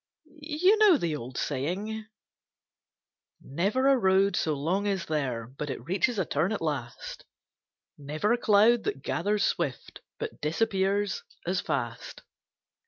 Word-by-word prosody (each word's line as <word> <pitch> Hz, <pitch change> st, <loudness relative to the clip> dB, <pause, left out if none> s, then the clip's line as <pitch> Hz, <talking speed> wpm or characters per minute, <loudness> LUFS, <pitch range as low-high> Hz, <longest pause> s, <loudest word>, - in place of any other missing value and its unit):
You 325 Hz, +8 st, +3 dB
know 410 Hz, -7 st, +7 dB
the 165 Hz, -, -1 dB
old 125 Hz, -2 st, -7 dB
saying: 195 Hz, +11 st, -3 dB, 1.3 s
'Never 200 Hz, -, 0 dB
a 275 Hz, -, +6 dB
road 195 Hz, -3 st, +3 dB
so 155 Hz, -2 st, 0 dB
long 180 Hz, +8 st, -1 dB
is 195 Hz, -3 st, -1 dB
there 130 Hz, -7 st, -2 dB
But 140 Hz, +5 st, -7 dB
it 125 Hz, -2 st, -5 dB
reaches 200 Hz, -, 0 dB
a 190 Hz, -, +1 dB
turn 155 Hz, +7 st, 0 dB
at 215 Hz, -, -1 dB
last; 140 Hz, -7 st, -4 dB, 0.8 s
Never 155 Hz, +10 st, 0 dB
a -, -, +2 dB
cloud 220 Hz, +2 st, +4 dB
that 135 Hz, -, -3 dB
gathers 205 Hz, 0 st, 0 dB
swift 145 Hz, -7 st, -2 dB, 0.2 s
But -, -, -6 dB
disappears 195 Hz, +4 st, 0 dB, 0.2 s
as 180 Hz, +1 st, 0 dB
fast. 120 Hz, -1 st, -4 dB
190 Hz, 135 wpm, -28 LUFS, 145-215 Hz, 1.3 s, know